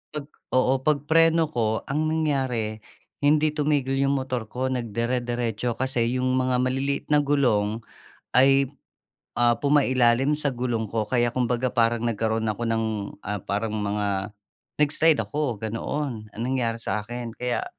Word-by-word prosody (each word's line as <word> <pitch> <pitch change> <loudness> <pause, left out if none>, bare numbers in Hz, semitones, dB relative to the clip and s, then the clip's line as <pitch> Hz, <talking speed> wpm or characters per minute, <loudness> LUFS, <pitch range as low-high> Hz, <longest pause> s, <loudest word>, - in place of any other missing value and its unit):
pag 150 -2 -4 0.3
oo. 130 +1 +3
Pagpreno 160 +4 +3
ko, 110 -4 0
ang 155 +3 -1
nangyari, 130 -9 -1 0.4
hindi 150 +1 +3
tumigil 145 -3 0
'yung 140 0 +2
motor 130 -4 -3
ko, 130 +4 -2
nag 120 -4 -3
dire-diretso 120 -1 -1
kasi 125 -1 0
'yung 130 0 +1
mga 130 0 +1
maliliit 135 +2 -1
na 150 - +6
gulong 120 -7 +1 0.5
ay, 135 +1 +5 0.7
ah, 120 -1 +3
pumailalim 135 0 +3
sa 145 -3 -1
gulong 120 -2 -1
ko 110 -2 -1
kaya 120 -2 +1
kumbaga, 125 0 0
parang 115 -1 +2
nagkaroon 110 0 0
ako 115 +2 -2
ng, 115 0 +1 0.4
ah, 105 -1 -3
parang 105 +3 -2
mga 100 -1 -1 0.5
nag-slide 150 +1 +3
ako, 145 -6 -2
ganoon 115 +2 -4
ang 110 - -8
nangyari 125 -3 0
sa 110 -2 -2
akin. 120 +1 -6
Kaya 125 0 -2
125 Hz, 140 wpm, -25 LUFS, 115-140 Hz, 0.7 s, na